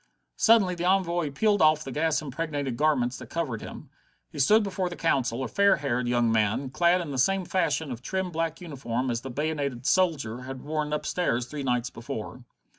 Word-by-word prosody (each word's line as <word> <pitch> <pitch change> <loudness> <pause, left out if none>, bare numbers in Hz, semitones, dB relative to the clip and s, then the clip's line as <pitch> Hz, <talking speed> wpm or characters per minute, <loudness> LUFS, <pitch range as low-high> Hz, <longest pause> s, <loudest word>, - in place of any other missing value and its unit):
Suddenly 220 -5 +4
the 175 0 -4
envoy 175 -4 +1
peeled 205 +8 +1
off 155 0 +4
the 135 - -7
gas 155 +2 0
impregnated 145 -2 -3
garments 130 -3 +1
that - - -10
covered 140 -10 -3
him. - - -10 0.4
He - - -8
stood 210 +11 +5
before 190 -2 -2
the 175 - -7
Council, 130 -7 0
a - - -2
fair 200 - +4
haired 125 -3 -1
young 120 -1 +2
man, 110 +4 +1
clad 175 +3 +3
in 160 -4 -5
the 135 - -2
same 195 +7 +2
fashion 160 -5 0
of 120 -1 -6
trim 190 +6 -2
black 165 -1 -2
uniform 130 -6 -3
as 115 -1 -2
the 135 - -7
bayonetted 140 -2 -2
soldier 145 -11 +1
had 130 0 -8
worn 150 0 -2
upstairs 150 -5 -1
three 145 +3 -6
nights 125 -2 -1
before. 115 +1 -7
150 Hz, 190 wpm, -27 LUFS, 125-170 Hz, 0.4 s, stood